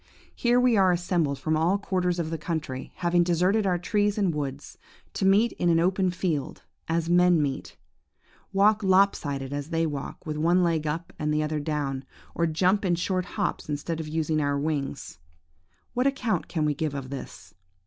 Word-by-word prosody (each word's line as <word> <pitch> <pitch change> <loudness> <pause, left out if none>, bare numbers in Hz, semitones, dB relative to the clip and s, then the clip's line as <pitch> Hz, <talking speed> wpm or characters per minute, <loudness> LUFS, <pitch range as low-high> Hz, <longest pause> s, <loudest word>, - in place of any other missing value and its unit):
Here 240 0 +2
we 250 -3 +4
are 190 -2 +5
assembled 170 -5 0
from 155 +4 -1
all 170 +5 +2
quarters 180 -3 -1
of 165 -2 -2
the 165 - -3
country, 150 -5 -4
having 175 -1 +2
deserted 180 +5 +2
our 180 -1 +2
trees 205 +3 0
and 195 -5 +1
woods, 145 -1 -5 0.3
to 195 - -1
meet 210 +5 +4
in 175 - +2
an 165 -1 +4
open 185 +2 +2
field, 170 -5 -3 0.2
as 165 0 0
men 175 0 +4
meet; 140 -3 -3 0.7
walk 205 +2 +4
lop 195 0 +4
sided 140 -2 -4
as 145 +1 -4
they 165 -1 +1
walk, 145 +3 -5
with 155 -1 -3
one 175 +4 +3
leg 160 -3 0
up 165 +3 -4
and 150 -1 0
the 150 0 +1
other 155 0 -2
down; 145 -3 -2 0.3
or 170 - +1
jump 185 +6 +2
in 180 -3 +2
short 185 +1 -1
hops - - -2
instead 150 +3 -3
of 160 - -5
using 155 0 0
our 145 -1 0
wings. 145 - -3 0.7
What 250 +2 +2
account 255 -5 -1
can 155 -3 -1
we 150 - +2
give 150 0 -3
of 135 -1 -6
this? 140 - -8
165 Hz, 190 wpm, -26 LUFS, 150-185 Hz, 0.7 s, are